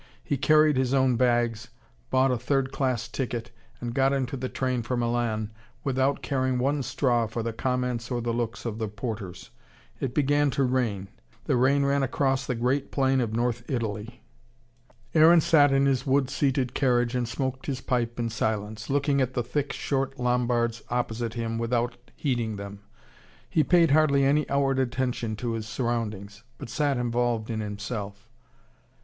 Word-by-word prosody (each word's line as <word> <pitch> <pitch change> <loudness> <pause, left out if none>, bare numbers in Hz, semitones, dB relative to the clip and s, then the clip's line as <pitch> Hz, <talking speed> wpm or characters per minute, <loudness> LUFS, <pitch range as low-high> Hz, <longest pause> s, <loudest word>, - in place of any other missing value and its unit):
He 145 - -1
carried 155 +1 +4
his 130 0 +1
own 130 -2 +3
bags, 120 -2 +1 0.4
bought 130 0 +3
a 125 - +1
third 135 +2 0
class 130 -5 -1
ticket, 120 -2 -4 0.3
and 120 -1 -4
got 135 +1 +3
into 135 -1 -1
the 130 -1 -4
train 130 -2 -1
for 120 +2 -2
Milan 115 -2 -1 0.3
without 135 0 0
caring 130 -2 0
one 140 +3 +1
straw 120 -2 +1
for 115 +1 -4
the 115 0 -3
comments 125 -1 -2
or 125 -2 -1
the 120 0 -2
looks 120 0 -3
of 115 -1 -3
the 110 - -1
porters. 105 -3 -6 0.5
It 130 -2 -3
began 145 0 +3
to 140 - +3
rain. 115 -7 0 0.4
The 140 - +1
rain 135 +3 +3
ran 140 0 +2
across 135 0 0
the 125 - -1
great 130 +4 0
plain 135 -1 +2
of 110 -2 -2
north 120 0 0
Italy. 115 -1 -4 0.9
Aaron 165 +2 +7
sat 145 -3 +5
in 135 0 +3
his 135 -2 +2
wood 135 -1 +1
seated 135 -3 0
carriage 120 -3 +2
and 125 -2 0
smoked 130 +2 -3
his 135 -3 -2
pipe 120 -2 -1
in 115 -1 -1
silence, 110 -1 -2
looking 140 0 +2
at 130 0 -1
the 120 - 0
thick, 140 +4 -2
short 135 -1 -2
Lombards 120 -2 +1
opposite 120 -1 -2
him 115 -1 -2
without 120 +1 0 0.2
heeding 120 -6 -1
them. 100 0 -7 0.7
He 155 - +2
paid 170 -3 +4
hardly 140 -2 +4
any 145 +2 +2
outward 135 -1 +1
attention 125 -3 -1
to 120 +2 -3
his 110 -1 -4
surroundings, 105 -3 -3 0.2
but - - -8
sat 140 +2 0
involved 120 -2 0
in 110 - -2
himself. 105 +1 -6
125 Hz, 170 wpm, -26 LUFS, 115-135 Hz, 0.9 s, Aaron